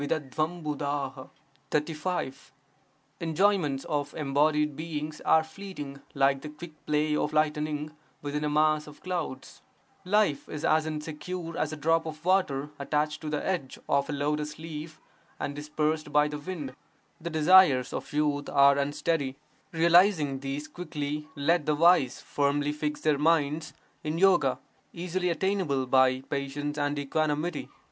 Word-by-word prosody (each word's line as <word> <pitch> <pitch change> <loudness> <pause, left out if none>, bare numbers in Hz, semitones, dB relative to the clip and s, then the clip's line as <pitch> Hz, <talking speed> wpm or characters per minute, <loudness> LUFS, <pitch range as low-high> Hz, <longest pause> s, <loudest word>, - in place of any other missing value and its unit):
Enjoyments 165 -4 +1
of 145 -1 -2
embodied 150 0 +2
beings 155 -1 -5
are 160 - +5
fleeting 160 -5 -8
like 135 0 +3
the 150 - -7
quick 160 +3 -10 0.2
play 150 0 +2
of 150 - 0
lightning 150 0 0 0.3
within 145 +1 -2
a 150 - +1
mass 155 0 +2
of 150 - -12
clouds; 165 -8 -4 0.4
life 190 -6 +1
is 150 - -4
as 155 0 +3
insecure 160 +3 -5
as 155 - -1
a - - -4
drop 165 +2 +2
of 155 +1 -8
water 150 -7 +1
attached 150 +1 -1
to 155 - -4
the 150 -1 -2
edge 175 -9 -2
of 140 0 +1
a - - -1
lotus 150 +1 -2
leaf 160 0 -7 0.4
and 145 - -3
dispersed 150 +1 -1
by 150 0 +4
the 150 0 -5
wind; 150 -5 -5 0.5
the 170 - -4
desires 155 -5 +5
of - - -5
youth 145 -1 0
are 140 0 +5
unsteady; 145 -1 -1 0.4
realizing 170 -4 +4
these 140 +2 -4
quickly, 150 -3 -4
let 155 +2 +1
the 150 - +3
wise 170 -5 +4
firmly 145 +1 0
fix 150 0 -3
their 150 -2 +2
minds 155 0 +2 0.3
in 155 +1 -2
yoga, 170 -9 +4 0.4
easily 180 +1 -2
attainable 170 -7 0
by 130 0 +4
patience 140 +2 -3
and 145 0 0
equanimity. 155 +3 -1
150 Hz, 135 wpm, -28 LUFS, 145-165 Hz, 0.5 s, are